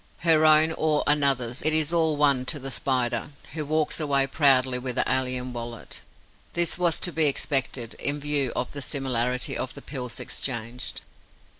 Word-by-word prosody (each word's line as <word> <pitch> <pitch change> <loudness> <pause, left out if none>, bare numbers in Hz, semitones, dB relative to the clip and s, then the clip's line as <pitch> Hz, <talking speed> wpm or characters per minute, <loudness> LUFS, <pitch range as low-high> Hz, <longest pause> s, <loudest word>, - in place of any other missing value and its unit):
Her 160 -2 +4
own 155 +1 +6
or 155 -2 0
another's: 140 -4 +1
it 155 +1 +2
is 155 +1 +2
all 160 -3 +2
one 140 -3 +3
to 150 - -1
the 135 -1 -5
Spider, 125 -1 0 0.2
who 155 - -3
walks 155 +2 -1
away 140 -3 +2
proudly 130 -3 +3
with 125 -1 -4
the - - +3
alien 125 -1 0
wallet. 120 -1 -7 0.5
This 175 -1 +1
was 175 -2 +1
to 175 - +1
be 160 -2 +2
expected, 135 -4 0
in 145 +1 -1
view 145 -3 -1
of 125 - -3
the 140 - -6
similarity 125 -3 -1
of 130 - -4
the - - -10
pills 125 -4 -5
exchanged. 120 0 -4
140 Hz, 170 wpm, -25 LUFS, 125-155 Hz, 0.5 s, own